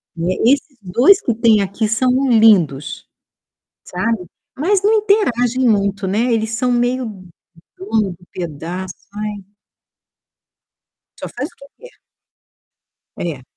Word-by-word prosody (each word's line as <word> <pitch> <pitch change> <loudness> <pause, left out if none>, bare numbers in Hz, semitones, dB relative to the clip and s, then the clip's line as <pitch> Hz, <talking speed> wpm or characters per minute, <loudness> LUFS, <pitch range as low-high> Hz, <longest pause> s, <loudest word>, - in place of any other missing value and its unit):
Né, 175 +2 -1
esses 275 +1 +2
2 245 - +4
que 240 - 0
tem 220 -2 +3
aqui 200 +3 -1
são 245 +4 +1 0.2
lindos. 190 - +3 0.8
Sabe? 200 +1 -2 0.3
Mas 380 +6 +1
não 420 +2 +3
interagem 260 - +2
muito, 200 -2 +1
né, 230 +6 0
eles 220 -1 0
são 250 +2 0
meio 245 +1 0 0.7
dono 205 -1 -1
do 180 +1 -16
pedaço. 175 +2 -6 0.2
Ai. 205 -2 -6 1.7
Só - - -6
faz 275 +6 -5
o - - -27
que 275 - -14
quer. - - -13 1.3
É. 155 -7 -4
220 Hz, 120 wpm, -18 LUFS, 190-250 Hz, 1.7 s, 2